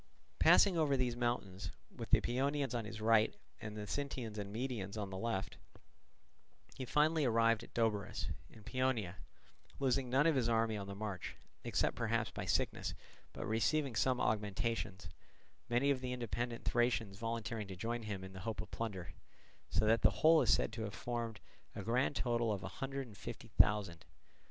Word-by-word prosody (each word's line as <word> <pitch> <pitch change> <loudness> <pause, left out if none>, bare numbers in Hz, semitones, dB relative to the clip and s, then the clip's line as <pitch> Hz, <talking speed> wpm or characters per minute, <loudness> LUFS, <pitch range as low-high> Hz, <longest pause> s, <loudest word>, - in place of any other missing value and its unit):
Passing 185 -5 +6
over 145 -3 +3
these 125 -2 0
mountains, 100 -5 -2 0.3
with - - -6
the - - +5
Paeonians 135 +1 0
on 115 -2 -1
his 105 0 -7
right 110 - +4 0.3
and 105 -1 -6
the 105 - -4
Sintians 120 -3 -3
and 100 -1 -5
Maedians 110 -4 -3
on 100 -2 -3
the - - -5
left, 115 -4 -2 1.2
he 130 - -4
finally 155 +4 +3
arrived 115 -2 +3
at - - -14
Doberus, 110 -4 0 0.2
in 110 - -15
Paeonia, 120 -7 0 0.6
losing 135 -1 +1
none 135 +4 +4
of 165 - +5
his 125 -4 +2
army 115 -1 +2
on 100 -1 -4
the 100 - -6
march, 100 -3 -4 0.3
except - - +1
perhaps - - 0
by - - -5
sickness, - - 0 0.4
but - - -6
receiving 120 +5 +1
some 125 +4 +2
augmentations, 105 -1 -1 0.6
many 125 +4 +3
of 130 -2 0
the 125 -1 -2
independent 120 0 -3
Thracians 120 -4 +1
volunteering 115 -2 -3
to 95 - -6
join 115 +5 -2
him 105 -4 -4
in 95 0 -9
the 95 - -8
hope 110 +2 -4
of 110 - -5
plunder; 100 -6 -4 0.6
so 110 - +2
that 115 +2 +4
the - - +7 0.2
whole 160 0 +8
is 120 -4 +3
said - - +3
to 115 - -4
have 105 -2 -4
formed 115 -3 -3 0.4
a - - -4
grand 125 +5 +1
total 120 -2 +1
of 100 -2 -2
a - - -3
hundred 135 0 -3
and 110 -4 -13
fifty - - -7
thousand. 100 -5 +3
115 Hz, 180 wpm, -36 LUFS, 105-125 Hz, 1.2 s, whole